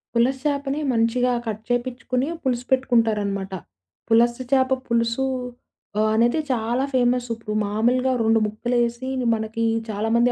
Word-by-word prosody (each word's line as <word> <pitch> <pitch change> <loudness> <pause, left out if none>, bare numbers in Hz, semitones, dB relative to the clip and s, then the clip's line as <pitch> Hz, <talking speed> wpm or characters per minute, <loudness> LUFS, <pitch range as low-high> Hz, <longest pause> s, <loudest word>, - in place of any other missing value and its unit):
పులస 250 +3 +3
చేపని 280 0 -1
మంచిగా 240 +2 +2
కట్ 220 -1 -4
చేపిచ్చుకుని 250 +1 -1 0.2
పులుసు 245 -2 -1
పెట్టుకుంటారనమాట. 210 -7 +1 0.6
పులస 235 +1 +4 0.2
చేప 265 -1 +3
పులుసు. 235 +2 +1 0.7
ఆహ్, 215 0 +3
అనేది 240 +7 +3
చాలా 240 +2 0
ఫేమస్. 245 -1 +2
ఇప్పుడు 215 -2 -6
మామూలుగా 240 +5 +1
2 225 0 +4
ముక్కలేసి 240 +3 -1 0.3
మనకి 220 +1 -3 0.3
చాలామంది 225 +4 +2
240 Hz, 115 wpm, -23 LUFS, 225-255 Hz, 0.7 s, పులస